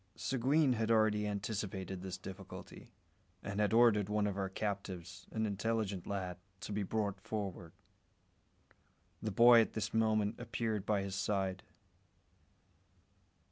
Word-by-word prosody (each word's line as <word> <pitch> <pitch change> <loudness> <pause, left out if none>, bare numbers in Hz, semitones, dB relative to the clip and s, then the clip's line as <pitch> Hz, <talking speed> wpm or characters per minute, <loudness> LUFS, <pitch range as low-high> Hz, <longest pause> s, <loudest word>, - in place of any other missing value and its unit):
Seguin 135 +2 +2
had 110 -1 -1
already 110 -2 +3
anticipated 100 -2 -3
this 95 0 -5
difficulty, 95 +1 -10 0.5
and 100 +1 -4
had 105 -2 +2
ordered 110 -3 +5
one 105 0 +1
of 100 -2 -1
our 95 -1 -2
captives, 95 -3 -5
an 110 0 0
intelligent 105 -2 -1
lad, 95 -3 -3 0.2
to - - -6
be 105 - -1
brought 100 -1 -2
forward. 95 -6 -4 1.5
The 110 - -1
boy 115 +3 +8
at 110 - -1
this 110 - -3
moment 110 -1 +2
appeared 115 -4 -2
by 100 -2 +2
his 100 -1 -4
side. 95 -1 -1
105 Hz, 130 wpm, -35 LUFS, 95-110 Hz, 1.5 s, boy